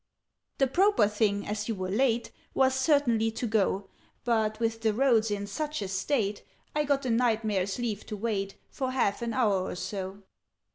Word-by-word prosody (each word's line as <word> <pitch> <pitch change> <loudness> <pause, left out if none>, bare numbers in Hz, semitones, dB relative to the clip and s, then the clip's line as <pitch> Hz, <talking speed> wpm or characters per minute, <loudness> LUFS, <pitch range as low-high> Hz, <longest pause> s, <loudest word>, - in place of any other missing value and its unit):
"The 270 - +4
proper 360 - +4
thing, 205 -1 0
as 210 +1 -3
you 225 - -1
were 185 -1 -3
late, 240 +1 +1 0.2
Was 265 0 +4
certainly 265 -5 +3
to 245 - -3
go: 200 -3 +1 0.4
But, 220 -2 +1
with 225 -1 -1
the 220 -2 +1
roads 235 -4 +3
in 205 -1 -2
such 300 +9 -3
a - - -3
state, 200 +2 -1 0.3
I 300 0 +2
got 280 -1 +1
the 250 - 0
Knight 230 -1 +2
Mayor's 195 -2 0
leave 230 -4 -3
to 215 - -5
wait 195 -2 -2 0.2
For 260 -1 -2
half 205 -6 +1
an 235 -1 -2
hour 210 -7 +2
or 185 - -4
so." 195 +1 -5
225 Hz, 185 wpm, -28 LUFS, 200-255 Hz, 0.4 s, The